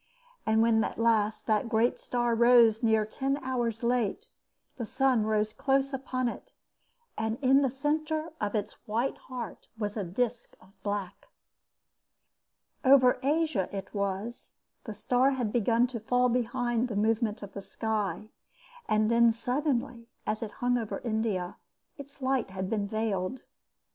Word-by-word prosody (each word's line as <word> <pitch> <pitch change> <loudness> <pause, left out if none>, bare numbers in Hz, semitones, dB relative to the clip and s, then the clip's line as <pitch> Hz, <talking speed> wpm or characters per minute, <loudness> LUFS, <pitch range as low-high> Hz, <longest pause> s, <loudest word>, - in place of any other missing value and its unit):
And 220 +1 +4
when 225 -1 +3
at - - -4
last 220 -2 +1
the 215 -2 +2
great 230 +1 +1
star 240 -1 0
rose 235 -1 +5
near 220 -2 +3
ten 270 +5 -2
hours 240 -3 -2
late, 240 - 0 0.5
the 235 - -3
sun 260 -5 +2
rose 215 0 +1
close 275 0 +1
upon 255 -1 -2
it, - - -7 0.7
and 220 +1 -1
in 270 0 +5
the 270 - +2
centre 310 +4 -1
of 210 +1 -1
its 210 0 -2
white 230 +5 0
heart 245 -3 -7
was 210 -2 -3
a 210 - -2
disc 235 +6 -3
of - - -20
black. 200 -1 -4 1.6
Over 260 -2 +6
Asia 290 - +1
it 195 -1 -6
was 200 +3 -3 0.3
the 220 - -5
star 250 +4 +2
had 230 -5 -1
begun 235 +1 +3
to 250 -2 -5
fall 250 +3 +2
behind 240 0 0
the 225 - -5
movement 220 +1 0
of 200 - -9
the 200 - -6
sky, 215 -2 -3 0.6
and 215 +1 +2
then 235 0 +5
suddenly, 245 0 -2 0.2
as 215 - -2
it 225 - -3 0.2
hung 245 0 +3
over 220 -3 -4
India, 220 -6 -2 0.4
its 280 -1 -11
light 260 -3 +1
had 190 0 -4
been 205 -2 0
veiled. 215 +1 -2
230 Hz, 150 wpm, -29 LUFS, 215-255 Hz, 1.6 s, Over